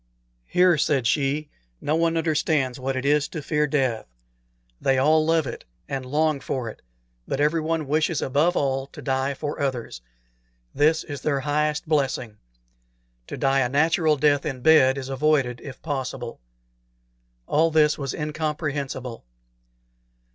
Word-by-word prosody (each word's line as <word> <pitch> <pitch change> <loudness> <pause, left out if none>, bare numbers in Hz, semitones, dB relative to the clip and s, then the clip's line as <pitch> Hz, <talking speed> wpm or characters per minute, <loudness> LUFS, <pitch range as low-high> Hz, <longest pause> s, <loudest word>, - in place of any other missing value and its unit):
"Here," 180 -3 +4
said 135 -4 +1
she, 145 +3 0 0.3
"no 150 - 0
one 165 0 +1
understands 150 -5 0
what 135 +1 -2
it 130 +1 -3
is 145 0 +3
to 160 - -6
fear 150 0 +1
death. 130 -6 0 0.7
They 135 -1 +2
all 155 +4 +4
love 160 -1 +2
it - - -6 0.2
and 130 -2 -4
long 155 +1 +1
for 130 -3 -3
it; - - -12 0.5
but 135 - -2
everyone 160 0 0
wishes 155 +1 +1
above 150 +7 +1
all 135 -1 0
to - - -12
die 135 0 0
for 145 +1 -4
others. 125 - -3 0.7
This 155 +2 +3
is 145 -3 -7
their 140 -3 0
highest 150 +1 -1
blessing. 130 -7 -1 0.9
To - - -6
die 135 0 +2
a 125 -2 +1
natural 155 +2 +2
death 145 0 +3
in 130 -3 -4
bed 135 -2 +5
is 135 -1 -5
avoided 135 -3 +1
if 135 - -9
possible." 130 -5 -4 1.1
All 160 - +2
this 155 -1 +3
was 135 -2 -3
incomprehensible. 150 -5 -3
145 Hz, 145 wpm, -24 LUFS, 135-155 Hz, 1.1 s, bed